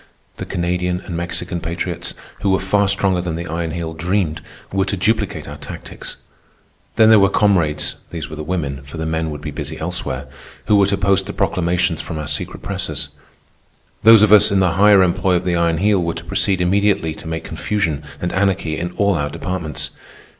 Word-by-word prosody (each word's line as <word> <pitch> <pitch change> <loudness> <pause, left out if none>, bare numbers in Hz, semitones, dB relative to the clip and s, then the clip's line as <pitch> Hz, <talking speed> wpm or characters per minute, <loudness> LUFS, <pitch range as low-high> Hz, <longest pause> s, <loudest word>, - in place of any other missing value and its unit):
The - - -6
Canadian 90 +1 -1
and 90 - -6
Mexican 85 +1 -3
patriots, 85 +1 -4 0.3
who 100 - +1
were 95 - +4
far 100 +1 +2
stronger 95 -2 +2
than 85 -2 -3
the 85 +1 -4
Iron 85 0 -3
Heel 80 0 -4
dreamed, 85 -1 -1 0.3
were 95 0 +2
to 100 0 -1
duplicate 110 +5 0
our - - -7
tactics. - - -8 0.8
Then 110 -1 +6
there 110 -1 +8
were 100 -1 +5
comrades 90 -8 +1
(these 80 -3 -5
were 75 - -8
the 75 - -5
women, 75 -5 -3
for 70 +3 -10
the 80 - -3
men 80 0 -1
would 75 -1 -6
be 75 -1 -5
busy 75 +1 -5
elsewhere) 80 -6 -3 0.4
who 105 - +4
were 100 -1 +5
to 100 0 +1
post 95 -1 +2
the - - -5
proclamations 90 -1 0
from 80 - -6
our 75 -1 -4
secret 75 0 -3
presses. - - -3 0.9
Those 110 -1 +8
of 105 0 +6
us 105 0 +7
in 100 - +3
the 90 -2 +3
higher 100 +2 +6
employ 90 +1 +2
of 90 - 0
the 90 -1 0
Iron 85 -1 +2
Heel 100 +1 +2
were 85 -1 -2
to - - -7
proceed 95 -2 +1
immediately 95 -3 +2
to 80 - -10
make 80 -1 -3
confusion 85 -9 -2 0.2
and 90 - -3
anarchy 95 -5 0
in 90 +1 -4
all 100 -1 +2
our 75 -4 -1
departments. 85 0 -4
90 Hz, 200 wpm, -19 LUFS, 80-100 Hz, 0.9 s, there